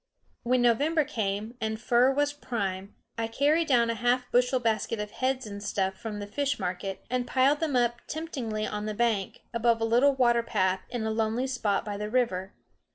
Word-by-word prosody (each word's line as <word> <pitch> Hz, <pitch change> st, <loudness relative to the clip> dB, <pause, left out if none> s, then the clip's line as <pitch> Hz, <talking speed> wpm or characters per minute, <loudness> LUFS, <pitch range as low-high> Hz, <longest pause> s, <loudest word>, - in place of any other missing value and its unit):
When 245 Hz, +1 st, +2 dB
November 290 Hz, +7 st, +3 dB
came, 215 Hz, -4 st, -3 dB
and 220 Hz, 0 st, -2 dB
fur 245 Hz, +2 st, +4 dB
was 290 Hz, +1 st, +1 dB
prime, 200 Hz, -8 st, -4 dB, 0.2 s
I 225 Hz, -, 0 dB
carried 295 Hz, +8 st, +2 dB
down 235 Hz, -4 st, +3 dB
a -, -, -1 dB
half 245 Hz, +2 st, 0 dB
bushel 250 Hz, +1 st, +3 dB
basket 220 Hz, -1 st, -1 dB
of 210 Hz, 0 st, -4 dB
heads 260 Hz, -1 st, -1 dB
and 205 Hz, -1 st, -7 dB
stuff 195 Hz, -2 st, -1 dB
from 215 Hz, +1 st, -6 dB
the 205 Hz, -, -5 dB
fish 280 Hz, +6 st, -1 dB
market, 185 Hz, 0 st, -4 dB
and 250 Hz, -1 st, 0 dB
piled 270 Hz, +3 st, +3 dB
them 310 Hz, -5 st, -1 dB
up 240 Hz, -1 st, +1 dB
temptingly 255 Hz, -10 st, -3 dB
on 210 Hz, 0 st, -4 dB
the 215 Hz, -, -3 dB
bank, 220 Hz, -4 st, 0 dB
above 235 Hz, 0 st, +2 dB
a 225 Hz, -, +1 dB
little 250 Hz, +5 st, +4 dB
water 240 Hz, -2 st, +3 dB
path, 190 Hz, -5 st, 0 dB
in 240 Hz, -3 st, -3 dB
a 220 Hz, -, -1 dB
lonely 225 Hz, +3 st, 0 dB
spot 240 Hz, -6 st, -1 dB
by 205 Hz, -1 st, -4 dB
the 210 Hz, +1 st, -4 dB
river. 200 Hz, -6 st, 0 dB
235 Hz, 195 wpm, -28 LUFS, 210-255 Hz, 0.2 s, fur